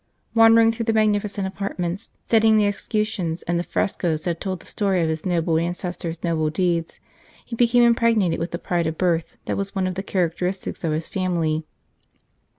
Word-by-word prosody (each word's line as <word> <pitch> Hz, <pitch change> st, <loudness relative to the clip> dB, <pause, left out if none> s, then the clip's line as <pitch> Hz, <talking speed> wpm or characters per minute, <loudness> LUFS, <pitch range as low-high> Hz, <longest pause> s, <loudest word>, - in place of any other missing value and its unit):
Wander 225 Hz, 0 st, +7 dB
ing 225 Hz, 0 st, +5 dB
through 230 Hz, 0 st, -4 dB
the 225 Hz, -, +1 dB
magnificent 210 Hz, -2 st, +1 dB
apartments, 190 Hz, 0 st, -4 dB, 0.2 s
studying 220 Hz, -1 st, +4 dB
the 210 Hz, -, +4 dB
escutcheons 205 Hz, -4 st, -2 dB
and 175 Hz, 0 st, -1 dB
the -, -, -1 dB
frescoes 165 Hz, -4 st, -1 dB
that 170 Hz, -2 st, -2 dB
told 185 Hz, -2 st, -3 dB
the -, -, -16 dB
story 195 Hz, -4 st, 0 dB
of 160 Hz, -, 0 dB
his 160 Hz, +3 st, -3 dB
noble 165 Hz, -2 st, +1 dB
ancestors 175 Hz, -1 st, -4 dB
noble 160 Hz, -3 st, +1 dB
deeds, 170 Hz, 0 st, -1 dB, 0.5 s
he 235 Hz, -, -6 dB
became 240 Hz, +1 st, +4 dB
impregnated 230 Hz, -6 st, +3 dB
with 165 Hz, +2 st, -2 dB
the 170 Hz, -, -4 dB
pride 170 Hz, -1 st, -1 dB
of 160 Hz, 0 st, -3 dB
birth 170 Hz, -3 st, 0 dB
that -, -, -2 dB
was 200 Hz, 0 st, -3 dB
one 190 Hz, -1 st, 0 dB
of 185 Hz, -, -1 dB
the 190 Hz, -, -3 dB
characteristics 180 Hz, 0 st, -2 dB
of 165 Hz, -, 0 dB
his 155 Hz, +1 st, -2 dB
family. 165 Hz, -4 st, -1 dB
185 Hz, 185 wpm, -23 LUFS, 170-210 Hz, 0.5 s, Wander